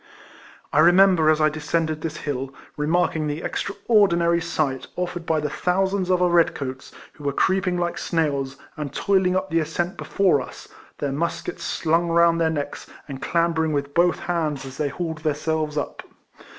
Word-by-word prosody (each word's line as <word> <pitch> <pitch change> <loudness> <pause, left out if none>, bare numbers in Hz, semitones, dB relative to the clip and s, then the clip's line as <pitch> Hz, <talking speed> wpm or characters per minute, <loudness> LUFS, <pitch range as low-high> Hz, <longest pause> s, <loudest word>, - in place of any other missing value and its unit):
I 145 - +4
remember, 175 -1 +6
as 155 0 +3
I 155 0 +4
descended 155 0 -2
this 155 -1 -4
hill, 135 -2 -4 0.2
re 150 0 -2
marking 165 -2 +1
the 150 +3 -4
extraordinary 195 -5 +2
sight 155 -6 -2
afforded 175 -1 -4
by 160 -1 +2
the 150 0 -2
thousands 190 +1 0
of 180 -1 +3
our - - +4
red 170 -1 +4
coats, 130 -1 -6 0.2
who 150 - -14
were 140 - 0
creeping 185 +4 +1
like 175 0 -2
snails, 140 -5 -1 0.2
and 150 -3 -5
toiling 185 +3 +2
up 190 -1 -1
the 165 - +3
as 155 - -3
cent 175 +2 -2
before 185 -8 +2
us, - - -10 0.3
their 145 -2 -2
muskets 170 +4 -3
slung 165 +1 +1
round 170 0 +4
their 160 - +3
necks, 145 -2 -4 0.2
and 135 -2 -7
clambering 165 -2 +1
with 140 0 -2
both 175 +2 +3
hands 155 -6 -2
as 135 0 -9
they 150 -2 0
hauled 160 +1 -4
there 155 -1 0
selves 155 0 -2
up. 145 - -3
165 Hz, 180 wpm, -23 LUFS, 150-175 Hz, 0.3 s, remember